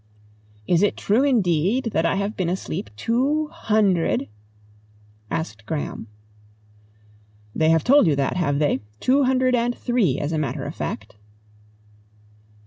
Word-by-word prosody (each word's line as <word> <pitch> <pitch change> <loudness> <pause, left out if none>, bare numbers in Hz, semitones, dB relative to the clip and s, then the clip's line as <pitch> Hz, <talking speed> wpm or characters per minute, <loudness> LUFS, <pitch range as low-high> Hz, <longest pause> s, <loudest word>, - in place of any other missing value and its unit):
"Is 170 - +2
it 205 - +1
true 220 +6 +2
indeed, 220 - +1
that 165 - +2
I - - 0
have 200 +2 -2
been 180 -3 -1
asleep 185 +1 -4
two 275 - 0
hundred 210 - +1 0.5
?" 105 0 -32
asked 110 -9 -8
Graham. 150 -7 -4 1.5
"They 160 0 +2
have 165 0 +3
told 280 -4 +5
you 150 - +3
that, 140 +3 -1
have 145 -6 0
they? 145 -3 +1 0.2
Two 270 +2 +3
hundred 255 0 +2
and 240 0 0
three, 225 - +1
as 145 +2 -3
a 160 - -1
matter 150 - -3
of - - -5
fact." - - -6
185 Hz, 140 wpm, -23 LUFS, 150-245 Hz, 1.5 s, told